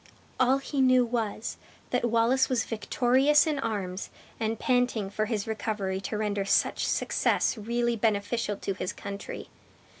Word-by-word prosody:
All 260 +1 +4
he 275 0 -2
knew 255 -1 +5
was, 230 -2 -3 0.3
that 245 -1 +1
Wallace 235 +3 +3
was 255 -3 +1
victorious 260 +7 +3
in 305 -3 -1
arms, 195 -6 -3 0.3
and 225 0 -1
panting 245 -5 +1
for 215 +1 0
his 215 -2 -2
recovery 210 -3 -2
to 210 +3 -3
render 205 -2 -1
such 195 - +1
success - - +1
really 235 +2 -1
beneficial 210 -1 0
to 195 - -3
his 185 -1 -4
country! 200 0 -7
225 Hz, 145 wpm, -28 LUFS, 205-250 Hz, 0.3 s, knew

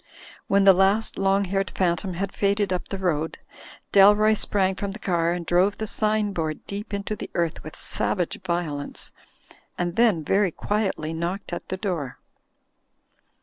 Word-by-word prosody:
When 200 0 +3
the 195 0 +8
last 195 +4 +2
long 195 +1 +2
haired 195 +1 -1
phantom 180 0 -1
had 195 +2 -3
faded 200 -1 0
up 180 - -3
the 195 - -4
road, 165 -4 -1 0.5
Dalroy 210 +2 +6
sprang 190 -2 +3
from 195 +1 -4
the - - -8
car 170 -5 0
and 175 -1 -4
drove 185 +4 +2
the 220 - -3
sign 215 -1 0
board 160 -3 -3
deep 200 +1 -6
into 200 +1 -3
the - - -7
earth 170 -2 -1
with 155 - -9
savage 175 -4 -2
violence, 160 -5 -3 0.7
and 175 0 -2
then 220 -9 +3
very 195 +5 +2
quietly 190 -4 -2
knocked 175 +3 -4
at - - -6
the 185 - -3
door. 175 - -3
190 Hz, 160 wpm, -24 LUFS, 170-200 Hz, 0.7 s, the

